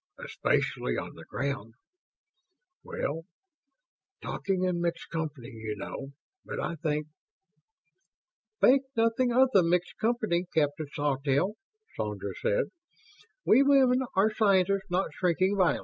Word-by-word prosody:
"Especially - - -1
on - - -5
the - - -12
ground... 135 -5 -4 1.1
well, 165 +3 -4 1.0
talking 190 -2 -2
in 180 -2 0
mixed 170 0 -3
company, 150 -7 -4
you 110 -3 -5
know, 135 +7 -7 0.3
but - - -6
I - - -2
think 150 -1 -1 0.8
..." 220 -12 -52
"Think 270 +2 +6
nothing 230 +2 +2
of 260 +2 +5
the 195 - +7
mixed 175 +1 0
company, 215 -7 +1
Captain 150 0 +1
Sawtelle," 145 +5 0 0.4
Sandra 100 -2 -4
said. 100 - +2 0.8
"We 240 - +6
women 270 -2 +5 0.2
are 210 +3 +3
scientists, 195 -2 +2
not 180 +2 0
shrinking 185 +2 +1
violets. 185 -3 +3
180 Hz, 120 wpm, -29 LUFS, 145-215 Hz, 1.1 s, the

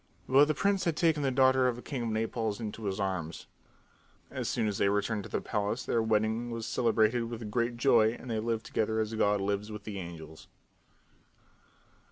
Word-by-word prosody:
But 135 +3 +6
the 155 0 -1
prince 200 +4 +1
had 165 -2 0
taken 160 -3 +2
the 140 - +1
daughter 130 0 +4
of 125 - 0
the 120 - -9
king 135 -4 -4
of 115 - -2
Naples 110 -1 -2
in 110 -3 -4
his 100 -3 -4
arms. 90 -5 -3 0.9
As - - -3
soon 115 -3 0
as 100 -2 -2
they 100 - +3
returned 105 +1 0
to - - -9
the - - -2
palace 105 +3 -2
their 115 - +1
wedding 110 +2 0
was 115 -1 -4
celebrated 115 0 +2
with 115 -2 -6
great 120 +1 0
joy 115 -3 +4
and 125 - -11
they 110 - 0
lived 115 0 -2
together 110 0 -1
as 110 0 -1
God 105 -2 +2
lives 100 +2 -2
with 105 - -7
the 100 -2 -6
angels. 80 -3 -9
110 Hz, 200 wpm, -30 LUFS, 105-120 Hz, 0.9 s, But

